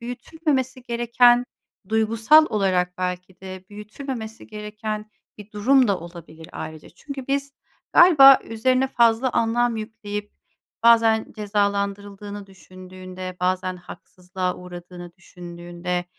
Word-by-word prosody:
büyütülmemesi 260 +1 -3
gereken, 240 0 +3 0.4
duygusal 225 +8 +4
olarak 185 -3 0
belki 180 0 -5
de 190 -1 -9
büyütülmemesi 220 +2 -8
gereken 215 0 -6 0.3
bir 210 0 -12
durum 255 +4 +3
da 195 -2 +1
olabilir 165 -2 -12
ayrıca. 155 -1 -8
Çünkü 270 - -9
biz 280 0 -2 0.4
galiba 275 -7 +8
üzerine 255 +4 0
fazla 235 0 +2
anlam 235 +1 +1
yükleyip, 215 -2 -6 0.5
bazen 225 -1 +4
cezalandırıldığını 205 0 -3
düşündüğünde, 185 -1 -10
bazen 185 0 -1
haksızlığa 180 +1 -6
uğradığını 175 -1 -10
düşündüğünde 175 0 -6
210 Hz, 100 wpm, -23 LUFS, 185-235 Hz, 0.5 s, galiba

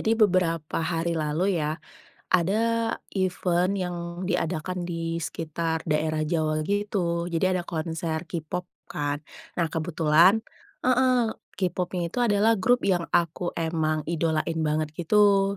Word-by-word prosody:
Jadi 220 - 0
beberapa 175 -7 +2
hari 165 0 -1
lalu 165 +3 0
ya, 150 +1 -1 0.5
ada 225 +6 +2 0.2
event 185 -1 +1
yang 180 -3 -2 0.3
diadakan 180 0 -1
di 165 -1 -3
sekitar 160 0 -3
daerah 155 0 0
Jawa 155 -1 0
gitu. 185 -3 -1
Jadi 170 +1 0
ada 185 -1 0
konser 160 -1 -3
k-pop 170 +1 -3 0.3
kan, 145 0 -1 0.4
nah 170 -2 +2
kebetulan 165 +5 +4 0.4
heeh, 255 -2 +3 0.2
K-popnya 180 -1 -1
itu - - -3
adalah 220 -1 +4
grup 245 +6 +3
yang 175 -4 +1
aku 170 +1 +1
emang 160 -2 0
idolain 165 0 0
banget 155 0 0
gitu. 200 +2 +3
170 Hz, 125 wpm, -26 LUFS, 160-190 Hz, 0.5 s, kebetulan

